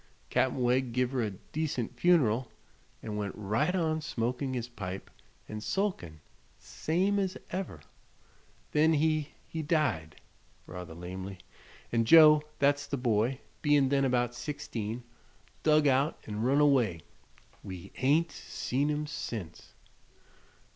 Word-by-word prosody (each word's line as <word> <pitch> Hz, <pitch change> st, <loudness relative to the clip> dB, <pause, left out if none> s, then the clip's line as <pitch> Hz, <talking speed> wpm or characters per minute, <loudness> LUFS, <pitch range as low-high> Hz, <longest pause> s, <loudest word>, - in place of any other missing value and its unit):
Cap'n 130 Hz, -, +2 dB
Wegg 125 Hz, 0 st, +2 dB
give 125 Hz, 0 st, +1 dB
her 130 Hz, -2 st, 0 dB
a 110 Hz, -, 0 dB
decent 125 Hz, +4 st, -4 dB
fun'ral 130 Hz, -6 st, +3 dB, 0.6 s
an' 105 Hz, -1 st, -4 dB
went 100 Hz, -2 st, -3 dB
right 110 Hz, -, 0 dB
on 160 Hz, -3 st, 0 dB
smokin' 130 Hz, -1 st, -2 dB
his 120 Hz, -1 st, -3 dB
pipe 95 Hz, -5 st, -7 dB, 0.4 s
an' 110 Hz, 0 st, -6 dB
sulkin', 110 Hz, -, -2 dB, 0.4 s
same 190 Hz, +6 st, 0 dB
as 190 Hz, -2 st, -1 dB
ever. 190 Hz, +1 st, -4 dB, 0.9 s
Then 155 Hz, +2 st, +4 dB
he 155 Hz, -1 st, +1 dB
he 160 Hz, -, -4 dB
died," 130 Hz, -, 0 dB, 0.5 s
rather 90 Hz, -2 st, -8 dB
lamely, 95 Hz, +2 st, -7 dB, 0.5 s
"an' 115 Hz, -1 st, +2 dB
Joe 150 Hz, +2 st, +8 dB, 0.2 s
thet's 140 Hz, +1 st, +2 dB
the 140 Hz, -, -2 dB
boy 125 Hz, +1 st, +1 dB, 0.2 s
bein' 145 Hz, -3 st, +4 dB
then 140 Hz, 0 st, +2 dB
about 120 Hz, -2 st, +1 dB
sixteen, 120 Hz, -4 st, -5 dB, 0.6 s
dug 155 Hz, -1 st, +4 dB
out 140 Hz, +2 st, +3 dB
'n' 105 Hz, 0 st, -4 dB
run 135 Hz, +5 st, +3 dB
away. 120 Hz, -, +3 dB, 0.6 s
We 95 Hz, 0 st, -8 dB
hain't 155 Hz, +5 st, +2 dB
seen 140 Hz, +4 st, -2 dB
him 150 Hz, 0 st, -1 dB
sense." 115 Hz, -, -6 dB
130 Hz, 125 wpm, -30 LUFS, 110-150 Hz, 0.9 s, Joe